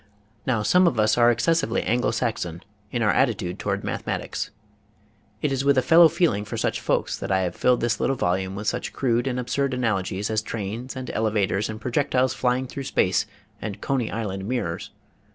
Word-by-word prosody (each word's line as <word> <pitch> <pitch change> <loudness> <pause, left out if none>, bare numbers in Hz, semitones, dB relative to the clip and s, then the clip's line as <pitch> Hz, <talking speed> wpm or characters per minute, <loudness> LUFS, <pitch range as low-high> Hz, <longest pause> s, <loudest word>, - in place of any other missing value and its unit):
Now 115 -5 +1
some 180 - +5
of 125 -9 +1
us 110 0 +4
are 120 0 +5
excessively 120 +2 +1
Anglo 120 +2 +1
Saxon 110 -7 -2 0.3
in 120 -2 0
our 105 - +4
attitude 100 -9 0
toward - - -2
mathematics. - - -3 0.9
It 150 - +1
is 135 0 0
with 140 -1 +3
a 130 - +4
fellow 165 +5 +8
feel 170 -4 +2
ing 100 +1 -3
for 105 - -6
such - - -1
folks - - 0
that - - -4
I 95 0 +3
have 90 -2 -2
filled 125 -1 +2
this 120 -1 0
little 135 - +1
volume 95 -2 -1
with 105 +2 -5
such 125 - -2
crude 120 -1 +1
and 125 -1 -1
absurd 135 +2 -1
analogies 100 -4 -1
as 110 -1 +1
trains 115 +4 -5
and 130 -1 -5
elevators 105 -1 0
and 110 0 -5
projectiles 130 +2 +1
flying 125 +1 0
through 135 +1 -6
space 90 -6 +1 0.3
and 105 -3 -5
Coney 130 -5 -1
Island 100 -3 -4
mirrors. 120 -10 -2
115 Hz, 190 wpm, -24 LUFS, 105-130 Hz, 0.9 s, fellow